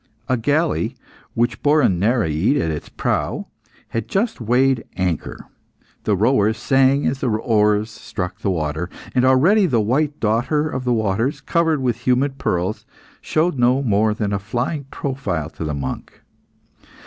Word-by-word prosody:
A 130 - +2
galley, 145 +7 0 0.4
which 120 +1 0
bore 150 +1 +4
a - - +6
Nereid 100 - +1
at 80 - 0
its 75 - -6
prow, - - -2 0.4
had 115 -2 -3
just 215 - -1
weighed 125 +2 +2
anchor. 90 -4 -2 0.6
The 105 - +2
rowers 110 0 +2
sang 135 +4 +3
as 130 +2 0
the 130 - 0
oars 105 -1 +1
struck 90 -3 -6
the - - -1
water; 80 -1 -2 0.2
and 125 - +2
already 170 +11 +4
the 125 -7 +2
white 140 +7 0
daughter 125 +8 +1
of 130 -4 -4
the 125 - +1
waters, 110 +4 0
covered 165 -4 +1
with 120 -1 -2
humid 135 +2 +1
pearls, 90 +4 -1 0.4
showed 155 -3 0
no 125 +3 +3
more 105 -2 +2
than 105 -2 -2
a 100 - 0
flying 125 - -3
profile 130 - -3
to - - -7
the 75 -2 -2
monk. 70 -2 -6
120 Hz, 155 wpm, -20 LUFS, 105-135 Hz, 0.6 s, a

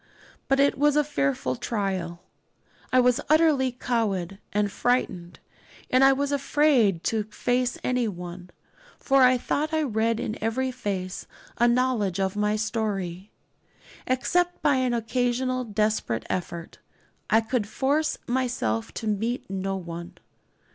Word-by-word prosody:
But 270 0 +2
it 280 -1 +3
was 295 0 +4
a 300 - +4
fearful 140 - -1
trial. 185 - -3 0.7
I 255 - +5
was 250 -1 +3
utterly 305 -5 +4
cowed 205 -7 -2
and 205 -1 0
frightened, 185 -8 -1 0.5
and 255 +1 +5
I 270 - +8
was 280 +1 0
afraid 275 - +2
to 220 -2 0
face 245 +3 -1
anyone; 180 -8 -3 0.5
for 275 -1 +3
I 255 0 +6
thought 305 +5 -1
I 315 - +2
read 225 -3 0
in 215 -2 -4
every 255 +4 0
face 195 -6 -4 0.3
a 240 - +5
knowledge 240 -7 +1
of 190 0 0
my 210 0 +1
story. 210 -4 -3 0.8
Except 350 +8 0
by 290 -3 +4
an 255 -2 +1
occasional 245 +2 0
desperate 210 - -1
effort, 170 -2 -5 0.5
I 220 - +5
could 225 -1 -1
force 285 +7 0
myself 240 - -1
to - - -5
meet 225 +4 -1
no 195 0 -2
one. 170 -1 -8
230 Hz, 135 wpm, -26 LUFS, 195-255 Hz, 0.8 s, I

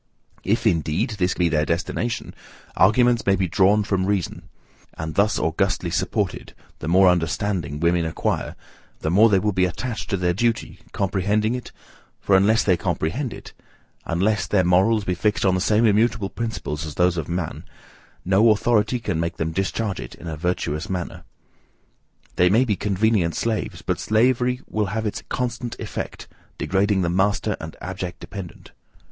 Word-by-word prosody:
If, 110 +5 0
indeed, 90 - +1
this 90 0 +1
be 90 - +2
their 75 -2 +1
destination, 115 +9 -2 0.4
arguments 120 +4 +4
may 100 - +5
be 95 -1 0
drawn 100 +4 +3
from 95 -2 0
reason; 100 -4 -2 0.5
and 80 0 -5
thus 105 +4 +2
augustly 90 +1 0
supported, 95 +2 -2 0.2
the - - -6
more 95 +3 +5
understanding 85 -3 0
women 85 +1 +2
acquire, 80 - -2 0.5
the 80 - -1
more 105 +6 +6
they 100 - +4
will 105 +2 +1
be 95 -1 +2
attached 110 +6 -4
to 100 - 0
their 90 -1 +1
duty, 115 +4 -1
comprehending 100 +3 0
it, 125 -1 -6 0.5
for 100 - +2
unless 105 +4 +4
they 95 - +3
comprehend 90 - -2
it, - - -10 0.5
unless 100 +6 0
their 95 -3 +2
morals 95 +5 +3
be 90 - 0
fixed 105 +4 0
on 95 - +4
the 95 - 0
same 105 +4 +3
immutable 110 -1 +2
principles 110 -9 -4
as 75 -2 -6
those 90 0 +2
of 80 -3 -4
man, 85 -2 -3 0.6
no 100 +5 +4
authority 110 +2 +2
can 95 -8 -2
make 85 0 -2
them 80 0 -1
discharge 95 +3 -2
it - - -8
in - - -13
a 80 -1 -4
virtuous 80 -1 -2
manner. 90 -2 -4 1.1
They 90 - +5
may 115 +7 +4
be 105 -4 0
convenient 100 -3 +1
slaves, 105 -6 -2
but 90 0 -1
slavery 125 +3 +2
will 105 -2 -1
have 110 +3 -3
its 105 - -3
constant 125 -1 -3
effect, - - -6 0.3
degrading 95 0 +1
the 85 - 0
master 100 +2 +1
and 80 0 -7
the - - -16
abject 90 -1 -5
dependent. 95 -4 -9
95 Hz, 165 wpm, -23 LUFS, 90-110 Hz, 1.1 s, more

